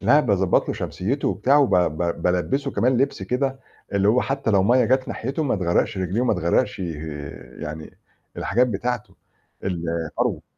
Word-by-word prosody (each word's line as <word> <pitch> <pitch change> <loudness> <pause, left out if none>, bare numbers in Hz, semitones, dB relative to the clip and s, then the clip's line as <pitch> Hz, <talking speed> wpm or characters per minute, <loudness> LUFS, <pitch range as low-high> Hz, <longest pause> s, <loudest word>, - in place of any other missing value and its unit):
لا، 150 - +5
باضبّط 100 -8 +2
له - - -1
شمسيّته 130 +10 -2
وبتاع، 140 +3 +2
وب 140 -8 +3
ب 85 -1 0
بالبّسه 135 +11 0
كمان 125 0 +2
لبس 135 +3 0
كده، 135 +1 -1 0.3
اللي 100 0 +2
هو 125 +4 +4
حتّى 135 -3 -1
لو 100 -2 +4
مَيّة 125 +5 +4
جات 130 +1 +1
ناحيته 135 +7 -3
ما 140 -7 +1
تغرّقش 90 +1 0
رِجليه، 95 +4 -1
وما 125 -3 +2
تغرّقش 85 -2 +1
ي 90 -3 -3 0.7
يعني 75 +1 -7 0.4
الحاجات 125 +2 +2
بتاعته، 120 +1 -3 0.5
الفرو. 85 -3 -2
105 Hz, 160 wpm, -23 LUFS, 90-130 Hz, 0.7 s, لا